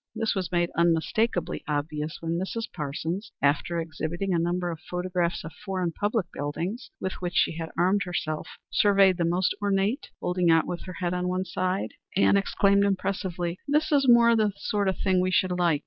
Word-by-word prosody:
This 225 0 0
was 185 -3 -3
made 175 -1 +1
unmistakably 170 +5 +1
obvious 150 +1 -2
when 165 +1 -1
Mrs. 210 +5 -3
Parsons, 165 +8 -4
after 145 +4 +1
exhibiting 165 +3 -3
a 170 - +2
number 175 +1 0
of 165 - -7
photographs 180 -1 -2
of 165 -1 -8
foreign 185 0 -3
public 205 +3 -1
buildings 170 - -4
with 185 - -3
which 175 -1 -3
she 165 - +2
had 165 -1 -4
armed 185 +4 +3
herself, 170 -3 -3 0.2
surveyed 195 -3 +4
the 170 - +1
most 180 +2 +1
ornate, 205 +6 0
holding 180 -1 +1
it - - +7
out 165 - +3
with 175 - -5
her 185 - -7
head 175 0 -2
on 180 0 -1
one 185 +1 -1
side, 185 +1 -2 0.2
and 200 - +5
exclaimed 200 0 +3
impressively, 185 -3 -1
"This 300 +2 +1
is 280 -2 +3
more 235 -1 +7
the 215 -2 +2
sort 205 -1 -1
of 190 - 0
thing 185 -2 +2
we 185 - +1
should 185 0 +2
like. 175 -4 +2
180 Hz, 190 wpm, -27 LUFS, 170-200 Hz, 0.2 s, it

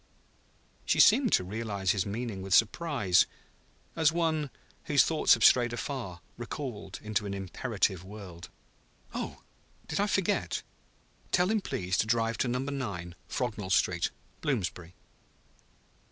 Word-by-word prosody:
She - - +1
seemed 265 -5 +6
to - - +4
realize 100 -1 -1
his 100 -1 0
meaning 110 -1 -4
with 95 0 +2
surprise, 115 - +3 0.7
as 160 -2 +4
one, 160 -3 0 0.4
whose 145 -2 +5
thoughts 160 -2 +4
have 115 - +2
strayed 120 -2 +5
afar, 120 -8 -5 0.2
recalled 120 -5 -6
to 105 +1 -2
an 100 - -3
imperative 95 -1 -1
world. 95 -3 -10 0.6
"Oh, - - -5 0.4
did - - -2
I 205 - +2
forget? 195 0 0 0.7
Tell 180 +2 +3
him 220 -1 +1
please 90 - -2
to - - +2
drive 115 0 +1
to - - +1
Number 125 +3 -1
Nine, 100 -11 -4
Frognall 110 -6 -3
Street, 90 -2 +2 0.3
Bloomsbury." 90 - -2
110 Hz, 130 wpm, -30 LUFS, 95-140 Hz, 0.7 s, seemed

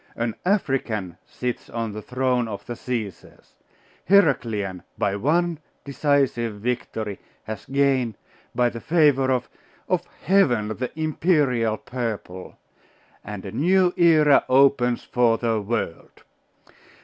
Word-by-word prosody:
An 115 -1 -2
African 120 - -1
sits 125 -1 -5
on 115 -2 -3
the 105 +1 -7
throne 125 0 0
of 100 -2 -7
the 120 - -5
Caesars! 115 -6 -6 0.6
Heraclian, 115 - +2 0.2
by 100 -1 0
one 165 - +1 0.3
decisive 140 -5 0
victory, 110 -2 -3 0.2
has 110 -1 -7
gained, 135 -5 +1 0.4
by 120 -1 +3
the 115 -1 -8
favour 145 -5 +3
of 130 -2 0 0.4
of - - 0 0.2
Heaven, 135 - +3
the 125 +3 -3
imperial 145 -8 +1
purple; 110 -8 -6 0.7
and 105 -2 -7
a 95 - -6
new 180 - +3
era 155 -4 +5
opens 130 -2 +3
for 120 -2 +2
the 115 -2 0
world. 105 -5 -4
125 Hz, 115 wpm, -23 LUFS, 110-140 Hz, 0.7 s, era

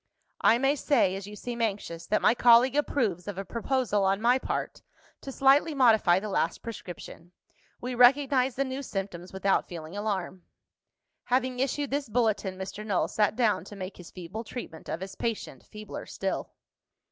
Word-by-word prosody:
"I 230 - +5
may 270 +3 +2
say 260 -9 +2
(as 195 0 -6
you 210 - -9
seem 235 +2 -5
anxious) 195 -6 -3
that 215 - +1
my - - +6
colleague 240 +2 +5
approves 225 - 0
of 205 - -5
a 195 - -4
proposal, 235 -3 0
on 195 +1 +2
my 245 +3 +3
part, - - -4 0.4
to 270 - -7
slightly 275 +4 +4
modify 220 -9 +5
the 215 - -6
last 185 -4 -1
prescription. 180 -5 -9 0.5
We 250 +1 -4
recognise 260 +1 +4
the 275 - 0
new 260 +1 -4
symptoms, 195 -7 -5
without 190 0 +1
feeling 165 0 -8
alarm." 195 -3 -3 0.8
Having 255 0 0
issued 275 +1 -1
this 280 -3 -2
bulletin, 210 -5 0
Mr. 190 +2 -6
Null 205 -4 0
sat 210 0 +1
down 230 -5 +2
to 205 - -10
make 190 -1 -7
his 180 - -11
feeble 185 +5 -7
treatment 215 -8 -8
of 165 - -3
his 190 0 -6
patient 230 +2 -4
feebler 215 -1 -8
still. - - -3
220 Hz, 170 wpm, -28 LUFS, 190-255 Hz, 0.8 s, my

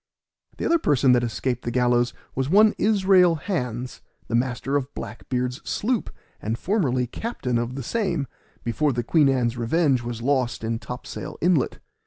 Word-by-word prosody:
The - - -3
other 335 0 +3
person 140 - +3
that 125 -1 +4
escaped 120 +1 -2
the - - -2
gallows 120 0 +2 0.2
was 135 +1 -1
one 210 +4 +6
Israel 190 -4 +4
Hands, 125 - -4 0.3
the - - -4
master 125 +3 0
of 140 -1 -1
Black - - -8
beard's 125 0 -1
sloop, 235 +1 -1 0.3
and 110 +2 -2
formerly 140 - +1
captain 125 - -3
of 120 +2 -3
the 135 - -4
same, 180 - -1 0.4
before 140 +5 +1
the 120 0 -1
Queen 145 +3 +4
Ann's 125 -3 +1
Revenge 135 +2 +2
was 120 -1 -5
lost 130 -4 0
in 115 0 -1
Topsail 125 +5 -7
inlet. 170 -6 +2
130 Hz, 165 wpm, -24 LUFS, 120-165 Hz, 0.4 s, one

